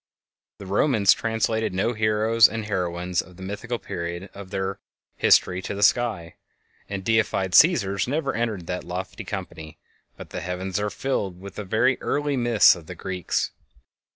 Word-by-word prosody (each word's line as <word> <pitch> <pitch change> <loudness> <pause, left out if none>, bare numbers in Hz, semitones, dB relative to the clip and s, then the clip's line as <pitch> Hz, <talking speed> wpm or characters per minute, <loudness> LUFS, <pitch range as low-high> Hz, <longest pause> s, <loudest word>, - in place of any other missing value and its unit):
The 100 - -10
Romans 100 +1 +4
translated 110 -2 -1
no 115 +6 +1
heroes 110 +1 +4
and 110 0 -4
heroines 90 -3 -1
of 90 0 -16
the 95 - -9
mythical 105 +5 -4
period 85 -1 -6
of 100 -1 -10
their 95 0 -3 0.4
history 90 0 +3
to 100 - -5
the 100 - -1
sky, 105 -7 +1 0.5
and 100 -1 -4
the 110 +3 +2
deified 100 -4 0
Cæsars 100 - +4
never 140 0 -1
entered 110 -7 -2
that 90 +2 -4
lofty 90 +5 -6
company, 90 -6 -7 0.4
but - - -11
the - - -5
heavens 90 +2 -3
are 105 0 -1
filled 100 -8 -3
with 100 0 -9
the 110 +6 +1
early 145 -1 -1
myths 120 -4 +5
of 85 -3 -13
the 90 - -7
Greeks. 90 -1 -2
100 Hz, 160 wpm, -24 LUFS, 90-115 Hz, 0.5 s, myths